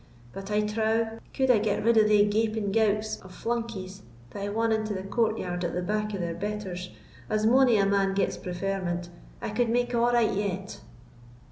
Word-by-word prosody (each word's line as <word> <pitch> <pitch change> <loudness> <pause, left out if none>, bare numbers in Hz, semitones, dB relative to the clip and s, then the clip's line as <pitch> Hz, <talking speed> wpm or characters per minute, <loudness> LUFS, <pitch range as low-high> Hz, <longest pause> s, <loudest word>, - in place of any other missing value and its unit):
But 195 +1 -7
I 210 0 +2
trow, 220 +1 0
could 265 -1 +2
I 230 - +4
get 205 -1 0
rid 230 +1 +4
of 215 -1 +5
thae 210 -1 +5
gaping 215 -1 0
gowks 215 0 +1
of 185 -1 -13
flunkies 225 -5 -4 0.3
that - - -7
hae 200 - -2
won 225 +2 0
into 215 -1 0
the 190 - -4
courtyard 195 -4 -1
at 175 - -2
the 180 - -1
back 210 +2 -1
of 190 - -3
their 170 -1 -2
betters, 190 -2 -4 0.4
as 215 0 +1
mony 250 0 +5
a 200 - +3
man 195 -1 +2
gets 200 - +1
preferment, 180 -1 -3 0.3
I - - -2
could 230 +2 +1
make 245 +1 +1
a' 235 - +2
right 240 -1 +3
yet." 195 -1 -3
210 Hz, 195 wpm, -27 LUFS, 195-225 Hz, 0.4 s, of